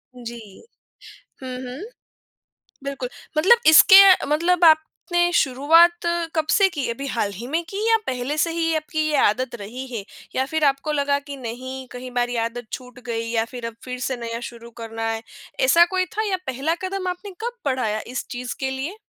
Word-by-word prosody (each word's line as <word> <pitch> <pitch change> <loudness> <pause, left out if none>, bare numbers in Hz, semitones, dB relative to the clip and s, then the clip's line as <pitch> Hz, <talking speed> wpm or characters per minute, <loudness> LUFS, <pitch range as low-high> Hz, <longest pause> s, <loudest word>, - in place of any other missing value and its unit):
जी। 230 -4 -10 0.8
हुँ, 255 -1 -6
हुँ। 255 +2 -7 1.0
बिल्कुल। 275 -3 -4 0.3
मतलब 430 +10 +6
इसके 385 +5 +9 0.3
मतलब 340 +4 +1
आपने 345 +2 +3
शुरुआत 330 +6 +4 0.3
कब 315 -1 0
से 395 -1 +5
की? 290 -8 -3
अभी 275 +4 -4
हाल 215 -5 -1
ही 230 +6 -7
में 325 +5 -1
की 390 - -6
या 450 - +5
पहले 255 +4 -2
से 330 +2 +1
ही 330 -1 0
आपकी 315 0 -3
ये 300 - +1
आदत 240 +3 0
रही 240 +6 -7
है 230 -5 -5 0.3
या 265 - +1
फिर 315 +2 -2
आपको 275 +2 +1
लगा 285 -1 +1
कि 280 -1 -9
नहीं, 260 +2 -7
कहीं 250 0 -8
बार 245 0 0
ये 245 - -3
आदत 235 0 -6
छूट 250 -1 -8
गई 230 -1 -3
या 225 -1 +1
फिर 240 -1 -8
अब 230 - -9
फिर 250 0 -6
से 255 +1 -2
नया 230 0 -5
शुरू 235 0 -13
करना 225 0 -4
है? 225 0 -4 0.4
ऐसा 345 -9 +6
कोई 370 0 +2
था 435 - +1
या 375 - 0
पहला 270 +6 -1
कदम 375 0 -3
आपने 365 +3 -5
कब 480 +1 -4
पढ़ाया, 250 -6 0
इस 255 +2 -4
चीज़ 245 0 -5
के 265 - -1
लिए? 275 +10 -5
265 Hz, 190 wpm, -22 LUFS, 245-325 Hz, 1.0 s, इसके